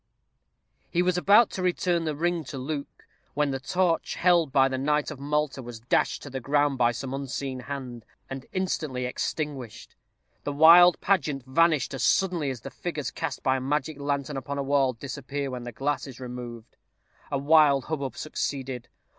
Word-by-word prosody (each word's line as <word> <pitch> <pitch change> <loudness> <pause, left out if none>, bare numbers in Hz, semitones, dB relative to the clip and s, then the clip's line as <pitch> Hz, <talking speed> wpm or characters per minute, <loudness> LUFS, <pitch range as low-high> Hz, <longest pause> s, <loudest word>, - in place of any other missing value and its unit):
_" - - -53 0.9
He 175 0 +1
was 180 0 +1
about 200 +5 +5
to 190 - -4
return 175 -2 +1
the 155 -2 -1
ring 170 +2 0
to 135 - -7
Luke, 140 +2 -6 0.3
when 145 -1 +1
the 135 - -2
torch, 175 +5 0
held 170 -5 +3
by 135 -1 +5
the 130 -1 -3
knight 150 +2 0
of 145 - -8
Malta, 145 -1 -1
was 120 -2 -8
dashed 120 - 0
to 145 - -9
the 130 - -3
ground 145 +1 +1
by 120 -1 +4
some 130 +2 -5
unseen 135 -1 -4
hand, 125 -3 -6 0.2
and 135 -1 -7
instantly 155 -9 -2
extinguished. 130 -2 -4 0.5
The 145 - -3
wild 170 +4 +8
pageant 150 -9 +1
vanished 150 0 +2
as 135 - -4
suddenly 170 +1 +2
as 130 -4 -5
the - - -8
figures 155 -7 -4
cast - - -4
by 130 0 +2
a - - -4
magic 150 +2 -2
lantern 140 0 -2
upon 140 +1 -4
a 140 - -1
wall 135 -2 +2
disappear 140 +2 -5
when 125 -1 -6
the 120 - -5
glass 140 +3 -2
is 130 -2 -10
removed. 120 -2 -8 0.5
A 140 - 0
wild 145 -1 +4
hubbub 140 -5 -4
succeeded. 135 -5 -4
140 Hz, 180 wpm, -26 LUFS, 130-155 Hz, 0.9 s, wild